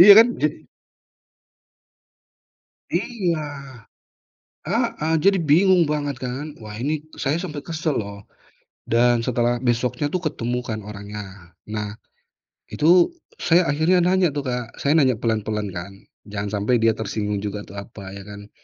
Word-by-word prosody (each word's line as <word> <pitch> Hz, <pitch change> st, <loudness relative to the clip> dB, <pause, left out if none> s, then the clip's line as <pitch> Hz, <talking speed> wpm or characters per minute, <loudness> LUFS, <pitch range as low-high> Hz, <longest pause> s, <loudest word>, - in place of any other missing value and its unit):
Iya 200 Hz, +3 st, +12 dB
kan. 230 Hz, -, +9 dB, 0.2 s
Jadi -, -, 0 dB, 2.3 s
Iya. 185 Hz, -10 st, 0 dB, 1.3 s
Heeh, 160 Hz, +2 st, 0 dB
jadi 195 Hz, 0 st, +5 dB
bingung 175 Hz, +4 st, +5 dB
banget 145 Hz, -4 st, -2 dB
kan, 135 Hz, +4 st, -4 dB
wah 105 Hz, -1 st, -8 dB
ini 145 Hz, +5 st, -1 dB, 0.2 s
saya 145 Hz, +4 st, 0 dB
sampai 150 Hz, -6 st, -5 dB
kesel 155 Hz, -3 st, -1 dB
loh, 100 Hz, -1 st, -5 dB, 0.6 s
dan 120 Hz, 0 st, +3 dB
setelah 120 Hz, -1 st, +1 dB
besoknya 125 Hz, +3 st, 0 dB
tuh 180 Hz, -, 0 dB
ketemu 120 Hz, 0 st, -2 dB
kan 110 Hz, -3 st, -4 dB
orangnya, 105 Hz, 0 st, -7 dB, 0.4 s
nah 105 Hz, -1 st, -4 dB, 0.8 s
itu 175 Hz, +3 st, +5 dB, 0.3 s
saya 175 Hz, +2 st, +4 dB
akhirnya 165 Hz, +5 st, +3 dB
nanya 180 Hz, -4 st, +3 dB
tuh 145 Hz, -, -1 dB
Kak, 125 Hz, -3 st, -4 dB
saya 150 Hz, +3 st, +4 dB
nanya 130 Hz, -4 st, +4 dB
pelan-pelan 110 Hz, -2 st, -1 dB
kan, 90 Hz, +2 st, -7 dB, 0.3 s
jangan 100 Hz, 0 st, -4 dB
sampai 120 Hz, +1 st, +2 dB
dia 115 Hz, -, +5 dB
tersinggung 105 Hz, -1 st, -2 dB
juga 105 Hz, 0 st, -4 dB
tuh, 100 Hz, 0 st, -11 dB
apa 100 Hz, -1 st, -8 dB
ya 100 Hz, 0 st, -9 dB
kan, 105 Hz, 0 st, -10 dB
125 Hz, 135 wpm, -23 LUFS, 105-155 Hz, 2.3 s, Iya